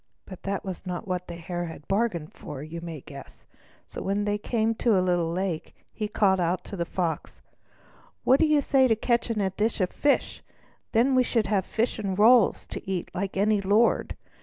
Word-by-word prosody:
But 185 - -10
that 200 0 -3
was 190 -2 -6
not 180 +1 -4
what 180 -1 -3
the 170 - -6
Hare 175 +1 -4
had 160 -2 -9
bargained 195 -6 -1
for, 140 -1 -8
you 165 +2 -7
may 165 -4 -7
guess. 140 0 -12 0.4
So - - -8
when 200 +1 -1
they 205 0 0
came 225 +1 0
to 225 -2 +2
a - - +4
little 175 -2 +1
lake, 180 -2 -3 0.2
he 215 - -3
called 195 -3 +2
out 175 +1 0
to - - -8
the 170 -2 -2
Fox: 170 -3 -3 0.8
"What 265 +2 +5
do 320 - +4
you 300 -1 +4
say 265 -1 +4
to 225 - +3
catching 230 0 0
a 190 -1 0
dish 215 +4 -1
of 185 -2 0
fish? 290 -1 0 0.5
Then 245 +4 +3
we 255 - +5
should 230 -3 +1
have 195 -3 0
fish 230 0 -1
and 195 -3 -2
rolls 225 +1 +5
to - - -7
eat 185 -3 -3
like 195 +1 -3
any 205 +1 +3
lord. 205 +4 +2
195 Hz, 205 wpm, -26 LUFS, 175-225 Hz, 0.8 s, What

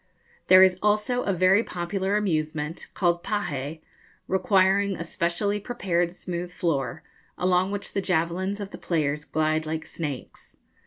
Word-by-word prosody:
There 185 0 +9
is 185 -1 +4
also 210 +4 +2
a 200 - +1
very 185 +4 +4
popular 190 +3 -1
amusement, 155 -4 -2
called 175 -2 +1
pahé, 160 -7 -3 0.5
requiring 195 +1 +3
a - - -4
specially 175 +5 -1
prepared 180 -6 -1
smooth 175 -1 -5
floor, 160 -2 -2 0.3
along 180 +1 +2
which 205 0 -4
the 195 - 0
javelins 185 +3 0
of 200 -1 -6
the - - -9
players 150 -3 -1
glide 155 0 0
like 155 0 -3
snakes. 145 -6 -7
180 Hz, 140 wpm, -26 LUFS, 160-195 Hz, 0.5 s, There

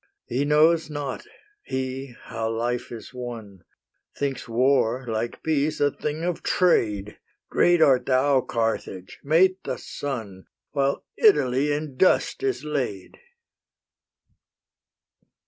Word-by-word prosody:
He 130 +4 -1
knows 155 +2 +4
not, 145 -3 -5 0.3
he, 130 - -4
how 115 -1 -3
life 120 +2 -2
is 120 +1 -9
won; 115 -6 -8 0.5
Thinks 140 -3 -3
war, 125 0 +2
like 115 +1 -3
peace, 155 -1 0
a 145 0 +3
thing 150 +3 -4
of 175 -1 -2
trade! 105 - +1 0.3
Great 175 -2 +4
art 130 -4 +4
thou, 135 +1 +3
Carthage! 115 -6 -3
mate 185 +6 +3
the - - -3
sun, 110 -9 -6 0.2
While 140 -1 0
Italy 145 - +4
in 145 -2 -3
dust 185 - +3
is 400 -1 -1
laid!" 130 -11 -4
135 Hz, 110 wpm, -25 LUFS, 115-150 Hz, 0.5 s, knows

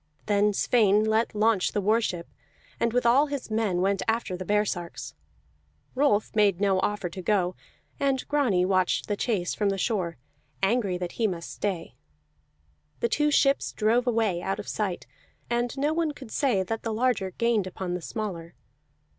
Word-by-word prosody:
Then 205 0 +3
Sweyn 210 -1 +3
let 220 +1 +1
launch 215 -2 +2
the - - +1
war 215 +4 +2
ship, 175 -6 -3 0.5
and 235 - +1
with 245 +1 0
all 265 +6 +5
his 280 -5 -5
men 215 -5 0
went 195 +1 +1
after 225 -4 0
the 185 - -5
baresarks. 195 -3 -2 0.8
Rolf 255 -7 +1
made 205 -4 +3
no 195 -2 +2
offer 205 -1 -1
to 185 +3 -7
go, 185 -2 +1 0.4
and 270 -2 0
Grani 245 -12 +2
watched 185 -1 +1
the 205 - 0
chase 200 -5 -1
from 205 -2 0
the 195 - -1
shore, 185 - -1 0.5
angry 200 -3 +1
that 180 -1 -4
he 220 - +4
must 170 -3 -5
stay. 185 -5 -3 1.1
The 235 - 0
two 295 +5 +2
ships 280 -1 +2
drove 235 +3 +2
away 220 -7 +1
out 195 - -2
of - - -7
sight, 195 -5 -2 0.5
and 240 +2 -1
no 290 +3 +1
one 325 -2 0
could 265 -6 -11
say 240 -10 +1
that 225 +4 -4
the 225 - -3
larger 220 -4 +1
gained 220 0 0
upon 185 -1 -4
the 180 - -3
smaller. 175 -4 -5
210 Hz, 170 wpm, -27 LUFS, 185-235 Hz, 1.1 s, all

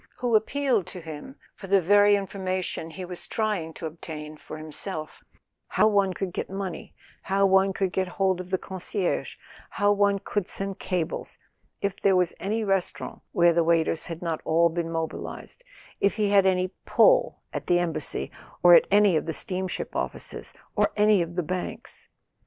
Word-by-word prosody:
—who 245 -2 +1
appealed 235 -2 +1
to 180 - -8
him 160 - -9 0.2
for 195 - -10
the 195 +1 +5
very 205 +3 +5
information 185 -4 -3
he 180 +3 -7
was 180 -1 -8
trying 210 -7 -1
to 160 - -8
obtain 155 -1 -7
for 155 - -9
himself: 155 +1 -6 0.4
how 215 - +3
one 200 -3 +3
could 185 0 -4
get - - -4
money, 195 -2 -5 0.3
how 195 +1 +2
one 190 0 +4
could 190 -1 -1
get 190 0 0
hold 190 0 0
of 180 - -10
the 185 - +1
concierge, 190 0 -3 0.3
how 205 0 +2
one 200 0 +3
could 200 0 -3
send 195 -1 -5
cables, 180 -3 -3 0.4
if 200 -1 -2
there 195 -1 +4
was 180 -1 +2
any 220 +3 -1
restaurant 195 -3 -2
where 170 -1 +4
the 170 0 +3
waiters 165 -1 +1
had 165 0 -6
not 165 -2 -2
all 170 +1 +3
been 165 0 -3
mobilised, 165 - -5 0.4
if 200 - +2
he 210 -2 +1
had 195 -2 +5
any 185 0 +2
"pull" - - +3
at - - -5
the 175 - +4
Embassy, 165 -4 -1 0.3
or 175 0 +9
at - - +7
any 205 -2 +5
of 155 - 0
the 160 - -1
steamship 185 +2 -3
offices, - - -4 0.2
or - - +2
any 210 -2 +5
of 170 0 -4
the 180 - 0
banks. 180 +3 -6
185 Hz, 175 wpm, -26 LUFS, 170-200 Hz, 0.4 s, or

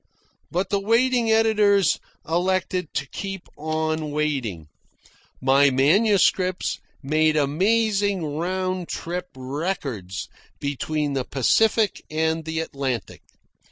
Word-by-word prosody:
But 180 +2 -2
the 200 - +2
waiting 230 +3 +2
editors 215 -3 +4 0.3
elected 180 0 0
to 140 - -1
keep 195 -2 -6
on 155 0 -2
waiting. 135 - -2 0.7
My 135 +2 +5
manuscripts 185 - +2 0.2
made 155 +2 +2
amazing 200 +5 +1
round 185 +1 -2
trip 180 +2 -4
records 130 - -4 0.3
between 145 +1 -2
the 135 -2 0
Pacific 215 - +2
and 160 +1 0
the 160 0 -2
Atlantic. 135 -6 -4
160 Hz, 95 wpm, -24 LUFS, 145-195 Hz, 0.7 s, My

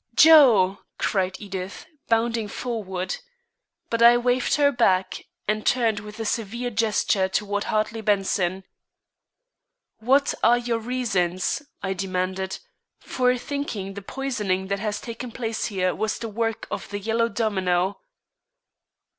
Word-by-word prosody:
"Joe!" 240 -12 +7 0.2
cried 190 -2 0
Edith, 195 -2 -6 0.2
bounding 230 -1 +1
forward. 195 -5 -4 0.7
But 230 0 0
I 235 +1 +8
waved 245 +1 +1
her 285 -1 +4
back, 190 -7 +1 0.2
and 215 +1 0
turned 230 -4 +2
with 210 +1 -10
a 225 - -3
severe 235 +3 -2
gesture 210 -3 +1
toward 205 +1 -1
Hartley 215 +1 -1
Benson. 195 -3 0 1.4
"What 270 +5 +3
are 240 +1 +5
your 240 -1 -1
reasons," 220 -5 -1 0.2
I 190 - -1
demanded, 190 0 -2 0.4
"for 250 0 +1
thinking 240 -7 -4
the 200 - -7
poisoning 200 -6 -2
that 200 0 -1
has 210 0 -2
taken 235 +1 -7
place 225 -2 -3
here 185 -4 0
was 220 0 -2
the 230 - -5
work 225 +1 -2
of - - -5
the 205 - -4
Yellow 225 +3 0
Domino?" 190 -4 0
215 Hz, 130 wpm, -24 LUFS, 190-235 Hz, 1.4 s, I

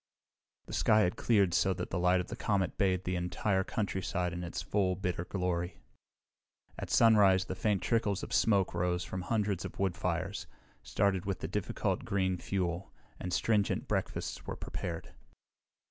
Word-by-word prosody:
The - - -9
sky 110 0 +4
had 90 -3 +1
cleared 100 -7 +3
so 95 +2 +3
that 90 - -5
the 90 - 0
light 90 +1 +4
of 90 - -4
the 120 - -4
comet 100 -5 0
bathed 95 -3 +1
the 90 - -1
entire 90 +3 0
countryside 95 -3 -2
in 90 +1 -4
its 85 - -4
full, 95 -3 +1
bitter 90 -2 -2
glory. 90 -2 -2 1.0
At - - -5
sunrise 100 -5 +5
the 95 - -4
faint 100 +1 0
trickles 105 -4 +1
of - - -5
smoke 100 -4 +3
rose 90 0 0
from 95 - -5
hundreds 100 -2 0
of - - -7
wood 95 -3 0
fires, 90 +1 -2 0.3
started 95 -2 0
with 95 - -2
the - - -2
difficult - - -1
green 95 -2 0
fuel, 90 -2 -2 0.3
and 90 - -4
stringent 105 +3 +1
breakfasts - - -3
were - - -3
prepared. 85 -1 -5
95 Hz, 165 wpm, -32 LUFS, 90-100 Hz, 1.0 s, sunrise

